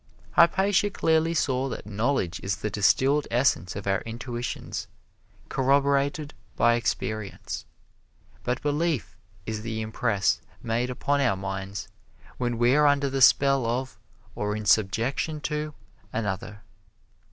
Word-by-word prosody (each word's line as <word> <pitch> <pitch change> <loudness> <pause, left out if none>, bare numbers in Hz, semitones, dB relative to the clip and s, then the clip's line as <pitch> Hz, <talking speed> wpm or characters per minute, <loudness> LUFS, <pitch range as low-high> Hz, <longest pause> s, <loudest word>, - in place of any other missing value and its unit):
Hypatia 190 +4 +4
clearly 160 -3 +1
saw 135 -3 +1
that - - -6
knowledge 105 -3 -1
is 95 -1 -1
the 105 - -4
distilled 135 +8 +3
essence 115 -8 +1
of 100 - -6
our 100 0 +1
intuitions, 120 +1 -5 0.6
corroborated 140 +2 +1 0.2
by 120 0 +4
experience. 110 -3 -3 0.8
But 125 +2 -2
belief 150 -2 0 0.3
is 110 -1 -3
the 110 0 -4
impress 110 -2 0 0.2
made 120 +2 0
upon 140 +3 0
our 120 -8 +2
minds 95 +1 -5 0.5
when 120 -2 -1
we 120 +2 +4
are 150 0 +5
under 140 -1 +2
the 135 0 -1
spell 135 -1 +5
of 125 -2 -3 0.3
or 105 0 -2
in 110 0 -5
subjection 115 - +1
to 150 0 -3 0.4
another. 105 0 -4
125 Hz, 125 wpm, -26 LUFS, 110-140 Hz, 0.8 s, are